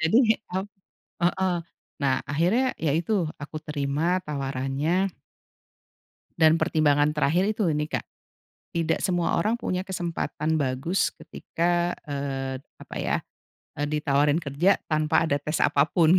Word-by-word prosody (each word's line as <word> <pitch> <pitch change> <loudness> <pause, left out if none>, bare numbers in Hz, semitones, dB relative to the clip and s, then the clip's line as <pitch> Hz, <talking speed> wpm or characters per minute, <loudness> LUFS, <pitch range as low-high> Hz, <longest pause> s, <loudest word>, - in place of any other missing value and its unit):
jadi 220 +8 +4 0.2
ap 190 +2 -1 0.6
heeh, 180 +1 +2 0.5
nah 135 -2 +3
akhirnya 175 - +2
ya 160 - 0
itu 175 +2 +1 0.2
aku 145 +2 -7
terima 150 +5 0
tawarannya 140 +6 -1 1.3
dan 160 +1 +5
pertimbangan 145 -1 +3
terakhir 170 +6 +2
itu 220 - +1
nih 150 0 -1
Kak, - - -10 0.7
tidak 165 -1 +1
semua 175 -2 +1
orang 215 +7 +2
punya 185 -5 -2
kesempatan 160 -3 -2
bagus 140 +6 0
ketika, 175 +1 -1
eee, 135 -2 -3 0.2
apa - - -10
ya, - - +1 0.6
eee, 145 - 0
ditawarin 150 +1 +2
kerja 155 +7 +3
tanpa 155 +1 +3
ada 145 -3 +1
tes 150 +2 -2
apapun, 160 +4 +4
160 Hz, 120 wpm, -26 LUFS, 145-175 Hz, 1.3 s, dan